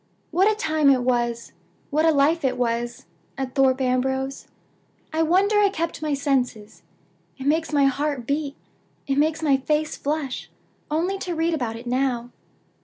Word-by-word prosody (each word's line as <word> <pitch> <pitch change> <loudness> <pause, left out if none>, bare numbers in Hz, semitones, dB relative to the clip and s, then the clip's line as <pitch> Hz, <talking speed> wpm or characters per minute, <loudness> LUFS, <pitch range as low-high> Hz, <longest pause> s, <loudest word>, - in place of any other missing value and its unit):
"What 380 +6 +4
a - - -1
time 310 -7 +2
it 260 -2 +4
was 240 -2 0 0.4
what 310 +2 +2
a - - +6
life 305 +3 +2
it 265 - 0
was, 240 -2 -2 0.3
at 265 -1 -4
Thorpe 265 -1 +3
Ambrose! 265 +1 -1 0.7
I 320 - +1
wonder 385 +6 +3
I 410 -1 +5
kept 335 -4 -3
my 305 -2 0
senses. 250 -6 -1 0.6
It 265 - -7
makes 315 +3 +1
my 285 -2 +4
heart 275 -2 0
beat, 285 +1 -2 0.5
it 275 0 0
makes 315 +1 +1
my 280 -3 +4
face 300 +3 -1
flush, 290 -3 -3 0.4
only 350 +6 0
to 355 -3 -3
read 325 +1 +1
about 245 -7 -2
it 230 +2 -9
now! 245 -1 -1
280 Hz, 165 wpm, -24 LUFS, 255-315 Hz, 0.7 s, a